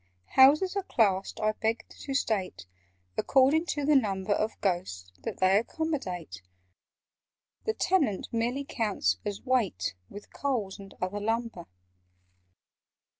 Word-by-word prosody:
"Houses 300 +9 +6
are 395 - +1
classed, 200 - +1
I 215 0 +2
beg 220 +2 -2
to 275 - -7
state, 190 - -1 0.5
According 280 +5 +4
to 290 -4 -1
the 300 0 +4
number 200 -6 +1
Of 215 +2 -2
Ghosts 95 - -2
that - - -5
they 190 +2 +4
accommodate: 215 - -4 1.2
(The 440 - 0
Tenant 300 - +1
merely 240 +4 -1
counts 205 - 0
as 205 -1 -4
weight, 195 - 0 0.2
With 205 - -11
Coals 225 -8 -2
and 195 -1 -11
other 185 +3 -2
lumber). 225 -4 -2
220 Hz, 125 wpm, -29 LUFS, 190-270 Hz, 1.2 s, Houses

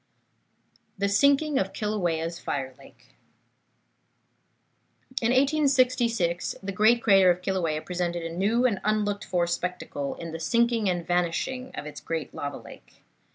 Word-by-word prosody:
THE 200 +1 0
SINKING 280 +7 +3
OF 195 0 -2
KILAUEA'S 175 -6 -2
FIRE 130 -2 -3
LAKE 135 - -18 2.1
In 225 - +2
1866 255 - +2
the 195 - -3
great 220 +5 +3
crater 195 -4 +6
of 180 +1 +1
Kilauea 170 -5 -1
presented 175 -1 -2
a 165 0 -5
new 220 +7 +2
and 210 -6 +1
unlooked 210 -1 0
for 175 -2 +1
spectacle 170 -5 -3
in 165 -1 -7
the 165 - -6
sinking 230 +4 +2
and 175 -2 -2
vanishing 180 +10 -1
of 150 - -6
its 150 -1 -8
great 165 -2 -4
lava 145 0 -5
lake. - - -15
190 Hz, 135 wpm, -26 LUFS, 170-235 Hz, 2.1 s, crater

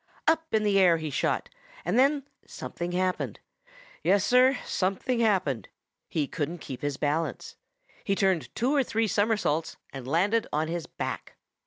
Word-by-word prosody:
Up 320 0 +2
in 215 -1 +2
the 200 -2 +3
air 175 -3 +6
he 155 -2 -4
shot, - - 0 0.4
and 245 - +2
then 280 +1 +3 0.2
something 175 +1 -5
happened. 185 0 -1 0.6
Yes, 195 +1 +3
Sir, 255 +2 +5
something 200 +7 0
happened. 185 - +1 0.4
He 155 -3 0
couldn't 160 +5 -3
kept 135 -5 -8
his 145 -1 -2
balance. 150 +3 -2 0.5
He 195 - +1
turned 190 -5 +1
two 250 +5 +1
or 275 - +4
three 225 -2 0
somersaults 205 -7 +1 0.2
and 135 -2 -7
landed 200 +10 +2
on 155 +1 0
his 170 -1 -3
back. - - -5
185 Hz, 155 wpm, -28 LUFS, 160-225 Hz, 0.6 s, air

